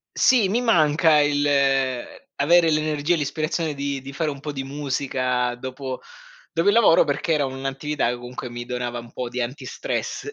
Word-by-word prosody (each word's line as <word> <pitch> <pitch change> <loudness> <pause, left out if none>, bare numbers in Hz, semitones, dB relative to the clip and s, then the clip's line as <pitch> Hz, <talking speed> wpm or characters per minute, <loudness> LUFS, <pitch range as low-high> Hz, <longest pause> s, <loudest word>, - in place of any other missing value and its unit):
Sì, 230 -7 +4
mi 230 - +1
manca 160 -7 +4
il 145 0 +2
uhm, 135 -3 +2 0.3
avere 165 +3 +4
l'energia 155 +1 +1
e - - +2
l'ispirazione 155 +2 -2
di 140 -1 -3
di 135 +1 -8
fare 155 +3 -1
un 140 - -8
po' 150 +1 -5
di 135 -2 -4
musica 130 -3 -1
dopo 130 +1 -6 0.5
dopo 165 +4 0
il 205 - +6
lavoro 220 -7 +6
perché 150 +3 -1
era 145 -3 +2
un'attività 135 +2 -2
che 120 - -1
comunque 125 +1 -7
mi 120 0 -6
donava 125 -1 -3
un 120 0 -12
po' 125 -1 -4
di 125 - -5
antistress 135 - -4
140 Hz, 180 wpm, -23 LUFS, 130-155 Hz, 0.5 s, il